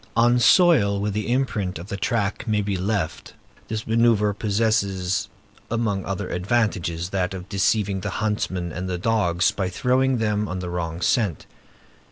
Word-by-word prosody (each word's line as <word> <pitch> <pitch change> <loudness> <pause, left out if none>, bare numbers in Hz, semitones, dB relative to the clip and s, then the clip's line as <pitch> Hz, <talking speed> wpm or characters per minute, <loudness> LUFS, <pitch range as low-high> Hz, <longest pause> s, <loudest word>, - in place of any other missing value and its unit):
On 120 +1 +4
soil 120 - +5
where 105 +1 -1
an 105 - -4
imprint 110 -5 -1
of 85 +5 -9
the - - -3
track 105 +1 -1
may 105 -2 +1
be 100 -1 -1
left, 95 -2 -3 0.3
this 110 -1 -3
manœuvre 110 -2 +3
possesses, 100 -4 0 0.4
among 110 -4 -1
other 95 -1 -3
advantages, 90 -4 -1
that 95 -1 -1
of 90 0 -8
deceiving 100 0 +1
the - - -3
huntsmen 95 -5 -2
and 90 +3 -4
the 90 - -2
dogs, 90 -3 +1
by 95 -2 -2
throwing 130 +6 +1
them 105 -2 0
on 90 - -4
the 90 -1 -5
wrong 85 -1 -3
scent. 105 - +1
100 Hz, 160 wpm, -23 LUFS, 90-110 Hz, 0.4 s, soil